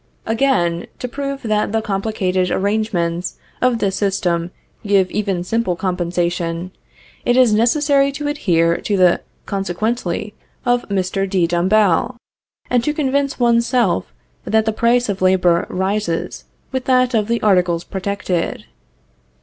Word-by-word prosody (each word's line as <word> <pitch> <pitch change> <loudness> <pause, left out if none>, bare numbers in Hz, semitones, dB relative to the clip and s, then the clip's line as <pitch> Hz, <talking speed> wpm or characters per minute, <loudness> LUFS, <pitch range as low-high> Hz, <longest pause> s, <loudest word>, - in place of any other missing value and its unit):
Again, 220 -8 +1
to 250 - -4
prove 275 +2 -5
that 215 -2 0
the 225 - +1
complicated 195 -3 -1
arrangements 190 -4 -1 0.2
of 250 -2 +3
this 195 -3 0
system 180 -4 0 0.3
give 200 -3 +2
even 195 -4 -1
simple 205 -1 -1
compensation, 175 -1 -2 0.5
it 245 +1 +2
is 250 -4 +5
necessary 275 +5 +3
to 290 +1 -4
adhere 170 - +1
to 205 - -1
the 180 -2 +4 0.2
"consequently" 200 +1 -2 0.3
of 245 -2 +1
Mr. 195 0 -1
de 185 -3 +2
Dombasle, 185 +5 +2 0.5
and 245 -2 +1
to 300 +3 -1
convince 280 -1 0
one's 235 -1 +3
self 240 - +1 0.3
that 220 0 +1
the 220 - 0
price 240 +2 +2
of 195 -2 -3
labor 180 -2 +3
rises 190 -2 -2 0.3
with 260 -1 -3
that 255 -1 +3
of 215 -3 +1
the 235 0 0
articles 180 -4 +2
protected. 190 -3 -3
200 Hz, 135 wpm, -19 LUFS, 180-235 Hz, 0.5 s, is